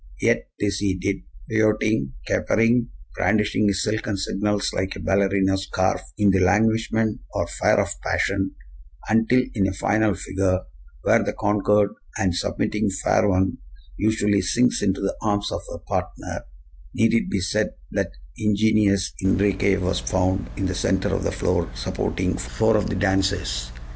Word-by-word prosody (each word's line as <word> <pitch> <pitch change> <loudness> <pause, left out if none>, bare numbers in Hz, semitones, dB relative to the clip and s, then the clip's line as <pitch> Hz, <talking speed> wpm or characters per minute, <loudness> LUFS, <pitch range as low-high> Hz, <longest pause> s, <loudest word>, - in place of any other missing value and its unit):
Yet - - +1
this 100 -2 0
he 95 -2 0
did, 95 +2 -1 0.3
pirouetting, 110 -9 +1
capering, 115 +2 +2 0.3
brandishing 105 +2 +2
his 100 -1 +1
silken 105 -1 -1
signals 100 +1 -1
like 95 0 -2
a - - -7
ballerina's 95 0 +1
scarf 95 0 0 0.2
in 100 -1 +4
the 95 - +2
languishment 110 - +2
or - - +1
fire - - +2
of - - +1
passion, 95 -1 -1 0.5
until, 115 +3 +3
in 100 -5 +1
a 95 - -2
final 105 +1 +1
figure, 95 0 0 0.4
where - - +4
the - - -2
conquered 105 0 +2 0.3
and 95 -2 +1
submitting 105 +4 -1
fair 95 +1 +2
one 95 0 +1 0.4
usually 105 - +2
sinks 120 +8 +2
into 95 0 0
the 100 - -1
arms 105 -1 0
of - - -3
her - - -5
partner, - - -4 0.5
need 115 +1 +3
it 115 - +1
be 100 - 0
said 105 +4 -1 0.2
that - - -1 0.3
the 110 - -6
ingenious 105 -2 +2
Enriquez 95 +1 +2
was 90 -5 0
found 95 +10 0
in 95 - -1
the 90 - -1
center 95 +1 0
of - - -1
the - - 0
floor - - 0
supporting - - -2
four 85 - +1
of 105 - +1
the 105 - -2
dancers! 95 -11 0
100 Hz, 155 wpm, -23 LUFS, 95-105 Hz, 0.5 s, in